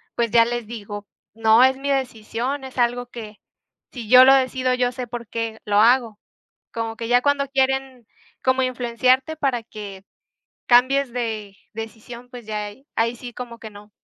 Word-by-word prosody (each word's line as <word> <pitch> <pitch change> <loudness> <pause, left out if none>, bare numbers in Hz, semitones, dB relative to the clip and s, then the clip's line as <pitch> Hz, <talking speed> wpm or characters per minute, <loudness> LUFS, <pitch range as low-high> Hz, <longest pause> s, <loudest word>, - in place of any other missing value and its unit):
pues, 235 -2 0
ya 230 - +6
les 240 -1 -3
digo: 205 -3 -8 0.3
"No, 225 +2 +5
es 265 0 +4
mi 280 +1 -4
decisión, 255 +1 -3
es 265 - -11
algo 245 0 +1
que, 220 -3 -10 0.6
si 235 -5 -8
yo 255 +1 +9
lo 265 - +8
decido, 255 -1 +1
yo 250 -1 +1
sé 250 0 -6
por 235 -1 -7
qué 230 -1 -4
lo 205 0 +2
hago". 230 -1 +3 0.5
Como 225 -1 -3
que 230 0 -6
ya 245 0 +4
cuando 285 0 +1
quieren 265 -3 -1 0.4
como 260 0 +3
influenciarte 255 +4 +1
para 265 -6 -1
que 200 -4 -10 0.6
cambies 255 +2 +4
de 220 -5 -4 0.2
decisión, 225 +2 -9
pues, 245 -2 -10
ya 210 -1 -3
ahí 235 +7 -12
ahí 230 +1 +1
sí, 245 +1 -9
como 235 -1 -8
que 220 - -9
no. 205 +1 -14
240 Hz, 175 wpm, -22 LUFS, 225-255 Hz, 0.6 s, yo